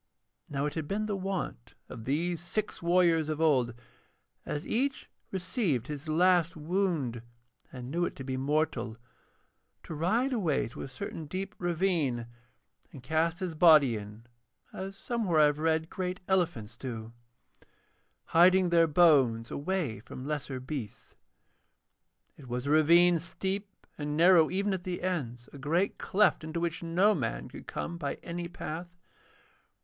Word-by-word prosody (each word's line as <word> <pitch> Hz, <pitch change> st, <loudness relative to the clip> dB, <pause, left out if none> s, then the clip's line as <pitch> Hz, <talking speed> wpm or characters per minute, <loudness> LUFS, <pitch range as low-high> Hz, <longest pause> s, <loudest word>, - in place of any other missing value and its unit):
Now 140 Hz, 0 st, -1 dB
it 150 Hz, -, -2 dB
had 160 Hz, -3 st, -4 dB
been 210 Hz, +4 st, -1 dB
the 210 Hz, -1 st, -2 dB
wont 190 Hz, -, -4 dB
of 110 Hz, -, -9 dB
these 165 Hz, +5 st, -1 dB
six 205 Hz, +4 st, -3 dB
warriors 170 Hz, -2 st, +3 dB
of 155 Hz, -1 st, -2 dB
old, 130 Hz, -7 st, +2 dB, 0.7 s
as 150 Hz, -, -3 dB
each 265 Hz, +4 st, -1 dB, 0.2 s
received 185 Hz, -, -1 dB
his 150 Hz, +1 st, -6 dB
last 170 Hz, +1 st, +3 dB
wound 155 Hz, -, -1 dB, 0.5 s
and 125 Hz, 0 st, -7 dB
knew 175 Hz, +2 st, +1 dB
it -, -, -5 dB
to 135 Hz, -, -7 dB
be 130 Hz, 0 st, -3 dB
mortal, 135 Hz, -4 st, -1 dB, 0.9 s
to -, -, -7 dB
ride 225 Hz, -, +1 dB
away 175 Hz, -, +1 dB
to -, -, -9 dB
a -, -, -5 dB
certain 160 Hz, +1 st, -6 dB
deep 195 Hz, +5 st, -4 dB
ravine 170 Hz, -9 st, 0 dB, 0.7 s
and 130 Hz, -, -11 dB
cast 160 Hz, +5 st, 0 dB
his 180 Hz, -3 st, -2 dB
body 155 Hz, -7 st, +6 dB
in, 105 Hz, +2 st, -8 dB, 0.5 s
as 195 Hz, +1 st, -6 dB
somewhere 200 Hz, -7 st, 0 dB
I 150 Hz, -, +8 dB
have 150 Hz, 0 st, +1 dB
read 160 Hz, 0 st, +1 dB
great 180 Hz, -1 st, -3 dB
elephants 160 Hz, -, 0 dB
do, 115 Hz, -3 st, -6 dB, 1.1 s
hiding 180 Hz, +2 st, +5 dB
their 170 Hz, -1 st, +5 dB
bones 140 Hz, -9 st, +4 dB
away 150 Hz, -, -2 dB
from 130 Hz, +4 st, -9 dB
lesser 145 Hz, -3 st, -3 dB
beasts. 130 Hz, -5 st, -7 dB, 1.2 s
It 140 Hz, -, -13 dB
was 125 Hz, +1 st, -3 dB
a 140 Hz, -, 0 dB
ravine 170 Hz, +3 st, +5 dB
steep 190 Hz, +4 st, -3 dB, 0.3 s
and 150 Hz, 0 st, -2 dB
narrow 170 Hz, -2 st, +6 dB
even 200 Hz, +1 st, 0 dB
at 185 Hz, -2 st, -3 dB
the 180 Hz, -1 st, -4 dB
ends, 125 Hz, -10 st, -3 dB
a 140 Hz, -, -10 dB
great 170 Hz, +8 st, 0 dB
cleft 205 Hz, -4 st, +2 dB
into 160 Hz, +2 st, -3 dB
which 170 Hz, -1 st, -2 dB
no 180 Hz, +5 st, +3 dB
man -, -, -3 dB
could -, -, -11 dB
come 170 Hz, 0 st, -4 dB
by 140 Hz, -3 st, -2 dB
any 170 Hz, 0 st, -4 dB
path. 170 Hz, 0 st, -6 dB
165 Hz, 150 wpm, -30 LUFS, 140-180 Hz, 1.2 s, I